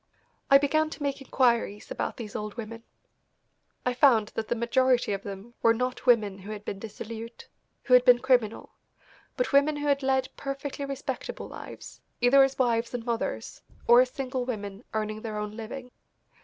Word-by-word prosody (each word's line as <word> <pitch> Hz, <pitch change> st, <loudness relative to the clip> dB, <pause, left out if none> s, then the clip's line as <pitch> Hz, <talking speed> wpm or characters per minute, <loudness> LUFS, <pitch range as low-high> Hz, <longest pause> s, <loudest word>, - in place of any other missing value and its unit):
I 275 Hz, -, +9 dB
began 310 Hz, +3 st, +1 dB
to 305 Hz, -, -7 dB
make 280 Hz, -1 st, -2 dB
inquiries 235 Hz, -6 st, +1 dB
about -, -, -3 dB
these 215 Hz, -4 st, -7 dB
old 210 Hz, 0 st, -4 dB
women. 230 Hz, 0 st, -7 dB, 1.0 s
I 250 Hz, -, +1 dB
found 240 Hz, -5 st, +4 dB
that 220 Hz, -1 st, -4 dB
the 240 Hz, -, 0 dB
majority 240 Hz, -1 st, +2 dB
of 195 Hz, -, -3 dB
them 200 Hz, +4 st, -8 dB
were 230 Hz, 0 st, +5 dB
not 250 Hz, +2 st, -3 dB
women 210 Hz, -5 st, +3 dB
who 195 Hz, +2 st, -10 dB
had 210 Hz, -1 st, -7 dB
been 195 Hz, -, -4 dB
dissolute, 225 Hz, +2 st, -8 dB, 0.4 s
who 255 Hz, -, +1 dB
had 250 Hz, 0 st, +8 dB
been 250 Hz, -1 st, +7 dB
criminal, 245 Hz, -4 st, +1 dB, 0.7 s
but -, -, -1 dB
women 285 Hz, +2 st, +4 dB
who 290 Hz, 0 st, -4 dB
had 280 Hz, -1 st, +2 dB
lead 265 Hz, -1 st, +1 dB
perfectly 275 Hz, 0 st, -5 dB
respectable 275 Hz, -1 st, -5 dB
lives, -, -, -10 dB, 0.2 s
either 245 Hz, +3 st, +6 dB
as 270 Hz, 0 st, +3 dB
wives 235 Hz, -1 st, +1 dB
and 235 Hz, -2 st, -5 dB
mothers, 225 Hz, -, -3 dB, 0.3 s
or 240 Hz, +1 st, +8 dB
as 255 Hz, -, +1 dB
single 260 Hz, -1 st, -3 dB
women 205 Hz, -4 st, -5 dB
earning 215 Hz, 0 st, -2 dB
their 215 Hz, -2 st, -5 dB
own 210 Hz, 0 st, -3 dB
living. 245 Hz, +3 st, -7 dB
240 Hz, 175 wpm, -27 LUFS, 215-265 Hz, 1.0 s, I